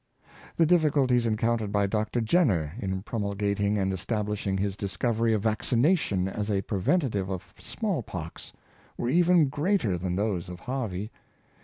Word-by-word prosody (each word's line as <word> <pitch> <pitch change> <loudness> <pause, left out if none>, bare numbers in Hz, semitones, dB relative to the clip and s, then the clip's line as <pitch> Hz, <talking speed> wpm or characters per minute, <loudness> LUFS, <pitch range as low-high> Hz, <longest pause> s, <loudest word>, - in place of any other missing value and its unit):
The 165 - +5
difficulties 145 -8 +3
encounted 110 -1 0
by 100 -1 +2
Dr. 110 +4 -1
Jenner 110 - +2
in 95 -4 -3
promul 100 -3 -3
gating 100 0 +1
and 95 -1 0
establishing 105 0 -2
his 100 0 -1
discovery 115 +3 0
of 105 -2 +1
vaccination 115 - +2
as 105 +2 -3
a 100 -2 0
preventive 105 - 0
of 95 +1 -6
small 205 - -2
pox, 85 -6 -7 0.5
were 120 - -1
even 175 +1 +4
greater 145 - 0
than 90 0 -2
those 95 -4 -1
of 90 0 -8
Harvey. 110 -6 -3
105 Hz, 145 wpm, -27 LUFS, 95-125 Hz, 0.5 s, The